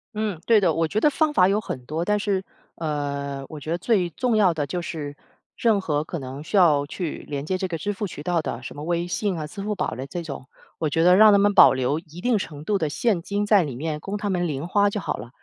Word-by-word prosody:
嗯， 210 -5 -2
对 225 -2 +6
的， 175 -5 +2
我 165 0 +1
觉 210 +6 0
得 - - +4
方 310 +1 +1
法 185 -8 +5
有 205 +2 +1
很 125 -10 -6
多， 160 +4 -2
但 210 +3 +1
是， 200 -2 -1 0.3
呃， 140 -3 -3
我 155 - -8
觉 150 - -8
得 170 - 0
最 190 -2 +1
重 240 +6 0
要 200 -4 +5
的 150 -2 -1
就 175 +6 -3
是 150 -4 -5 0.4
任 225 -4 +2
何 150 -5 -1
可 170 - -5
能 135 -1 -7
需 200 - -1
要 155 -6 +5
去 170 0 -5
连 140 -1 -3
接 185 +3 -1
这 190 - -1
个 170 -2 -3
支 205 +6 -2
付 205 +1 -3
渠 150 -4 -9
道 175 -1 +1
的， 125 -4 -5
什 130 - -8
么 145 - -7
微 170 +1 -1
信 185 +1 -2
啊、 155 - -4
支 195 +7 -8
付 210 +1 -2
宝 - - -2
的 130 +5 -6
这 170 +4 -5
种， 140 -4 -7 0.3
我 155 - 0
觉 165 +3 +1
得 180 +1 +6
让 215 +2 +8
他 200 - +6
们 205 +1 +3
保 190 - +8
留 130 +4 0
一 165 +1 -12
定 240 -1 +2
程 150 -5 -7
度 205 +1 +1
的 155 - 0
现 200 +3 0
金 205 +4 -2
在 205 -2 +5
里 145 -6 -4
面 150 +3 -3
供 195 +6 -4
他 205 -1 -2
们 175 -2 0
零 145 +2 -4
花 205 +2 +3
就 205 +1 -3
好 - - -2
了， - - -9
175 Hz, 295 characters per minute, -24 LUFS, 150-200 Hz, 0.4 s, 让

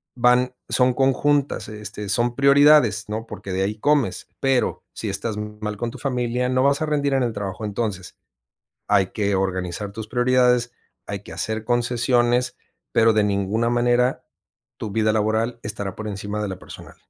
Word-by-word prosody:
van 125 +1 +3
son 125 -1 +3
conjuntas, 140 +2 +1
este, 105 -1 -6
son 120 +3 +1
prioridades, 140 -2 +5
¿no? 110 +2 -4
Porque 100 - -8
de 95 - 0
ahí 105 +2 -2
comes, 145 +2 +1
pero 135 -2 +1
si - - -4
estás 110 -3 -3
mal 105 0 -5
con 120 +2 -3
tu - - -11
familia, 125 -2 -1
no 130 0 +2
vas 140 +2 +2
a 155 - 0
rendir 145 -2 0
en 135 -1 +2
el 120 -2 -1
trabajo. 100 0 -5
Entonces, 105 -3 -4 0.7
hay 100 -2 +3
que 100 0 -1
organizar 95 +1 -2
tus 110 +1 -7
prioridades, 125 0 +2 0.3
hay 100 - -4
que - - -13
hacer 110 0 -3
concesiones, 120 +1 +1 0.3
pero 115 0 +4
de 110 -1 +3
ninguna 105 +3 0
manera 120 +1 +2 0.5
tu 105 - -5
vida 110 +1 +2
laboral 110 +2 0
estará 100 -2 -4
por 110 - -6
encima 105 +1 -4
de 105 - -2
la 95 - -5
personal. - - -12
115 Hz, 170 wpm, -22 LUFS, 105-125 Hz, 0.7 s, prioridades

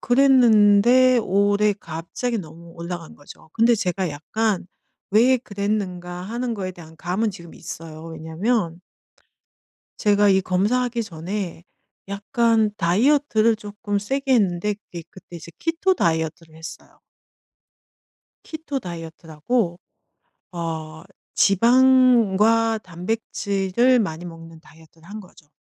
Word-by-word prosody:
그랬는데 245 -1 +5
올해 205 0 +2
갑자기 190 +7 -5
너무 170 -1 -11
올라간 170 -1 -7
거죠. 145 +2 -16
근데 230 +1 +4
제가 190 -3 -2
약간 190 +7 -2 0.4
'왜 240 +6 +5
그랬는가?' 195 -5 -4
하는 235 +4 -3
것에 190 -3 -4
대한 160 -2 -14
감은 190 +7 -1
지금 170 -4 -12
있어요 160 -1 -9
왜냐면 165 +3 -2 1.2
제가 205 0 +3
이 190 -1 +4
검사하기 235 +7 0
전에 180 -1 -6 0.4
약간 220 +2 +1
다이어트를 225 - +2
쪼끔 205 -1 -4
세게 270 +7 -1
했는데 205 -2 +1
그게 180 -4 -11
그때 185 -2 -13
이제 170 0 -11
키토 335 +4 +1
다이어트를 160 - -2
했어요. 160 +1 -11 1.4
키토 310 -3 -5
다이어트라고 170 +2 -3 0.7
어 160 -2 -6 0.3
지방과 230 -1 +4
단백질을 200 +4 0
많이 175 -5 -3
먹는 165 -1 -11
다이어트를 160 0 -20
한 210 +2 -8
거죠. 180 -6 -17
200 Hz, 260 characters per minute, -22 LUFS, 170-230 Hz, 1.4 s, 그랬는데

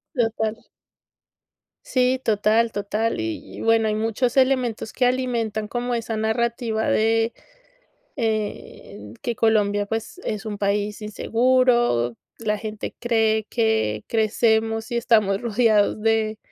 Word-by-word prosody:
Total. 225 -2 -1 1.2
Sí, 255 0 +1
total, 220 +2 +2
total. 210 +2 -2
Y 110 0 -5
y, - - -7
bueno, 225 -1 +3
hay 210 - 0
muchos 225 +3 -1
elementos 255 -4 +1
que 255 - +1
alimentan 235 -4 -1
como 245 +2 -3
esa 230 -1 -3
narrativa 220 0 -1
de 225 +1 +2 0.8
en 210 - -4
que 240 - -2
Colombia, 205 -2 +2
pues, 225 - -5
es 215 0 -4
un 210 -1 -4
país 205 +1 -1
inseguro. 240 - +2 0.2
La 210 -2 -1
gente 215 0 -6
cree 225 -2 +1
que 220 - 0
crecemos 225 0 +1
y 235 - 0
estamos 215 -5 +2
rodeados 215 -2 +2
de 220 -1 +1
220 Hz, 120 wpm, -23 LUFS, 210-235 Hz, 1.2 s, bueno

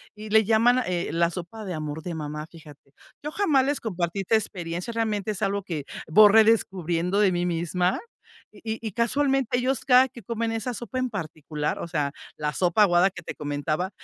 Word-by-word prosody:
y 215 0 -9
le 220 0 +5
llaman, 230 +4 +4
eh, 175 -1 -1
la 170 +1 +2
sopa 180 +5 -7
de 185 - -4
amor 155 0 -5
de 175 -1 -5
mamá, 150 0 -5
fíjate. 150 -4 -16 0.3
Yo 300 - -5
jamás 305 -8 +2
les 285 +1 -1
compartí 180 -3 -2
esta 195 +4 +1
experiencia, 180 -1 -3
realmente 215 -2 -1
es 205 - -6
algo 200 0 0
que 165 -6 -4 0.2
voy 205 +6 +7
redescubriendo 195 -5 +2
de 205 -2 +4
mí 175 0 0
misma, 180 - 0 0.5
y 210 - -16 0.2
y 225 0 -7
y - - -4
casualmente 270 +2 +1
ellos 255 0 0
cada 255 0 +6
que 245 -2 -13
comen 230 +1 -2
esa 225 +2 -3
sopa 240 +4 -5
en 255 - -1
particular, 155 -6 -4
o - - -5
sea, 150 -4 -1 0.3
la 150 0 -2
sopa 180 +6 +3
aguada 180 -1 +4
que 195 - -11
te - - -6
comentaba, 150 +5 -2
195 Hz, 195 wpm, -25 LUFS, 170-225 Hz, 0.5 s, voy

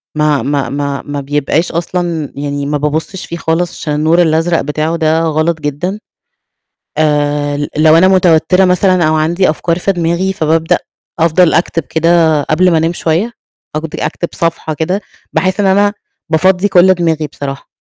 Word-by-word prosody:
ما 150 -2 +1
ما 140 -1 -1
ما 140 0 -3
ما 145 -1 -4
بيبقاش 145 +4 -1
أصلًا 170 -2 -3
يعني 145 0 -4
ما 150 +1 -1
بابصش 155 +6 -3
فيه 170 - -6
خالص، 170 +1 -2
عشان 150 - -3
النور 160 +3 +3
الأزرق 165 +1 +1
بتاعه 155 +3 -2
ده 160 -1 +1
غلط 160 +1 0
جدًا. 150 +8 -3 1.0
آآ 145 -1 0
لو 155 +1 +5
أنا 185 - +5
متوترة 180 0 +3
مثلًا 180 0 +2
أو 155 - +1
عندي 170 +4 +1
أفكار 165 +2 -1
في 195 - 0
دماغي 175 +2 -1
فابابدأ 160 -2 +1 0.4
أفضل 165 +1 +3
أكتب 165 -1 0
كده 160 -1 +2
قبل 175 +6 +2
ما 165 - +3
أنام 165 +2 0
شوية 175 +7 -1 0.4
أقض 155 +1 -3
أكتب 170 - -3
صفحة 165 -1 -2
كده 180 +6 -2 0.3
بحيث 185 +1 0
إن 205 - +2
أنا 200 +2 +3 0.4
بافضّي 180 +4 +2
كل 185 -1 +5
دماغي 165 -3 -1
بصراحة. 140 -1 -7
160 Hz, 160 wpm, -13 LUFS, 150-175 Hz, 1.0 s, لو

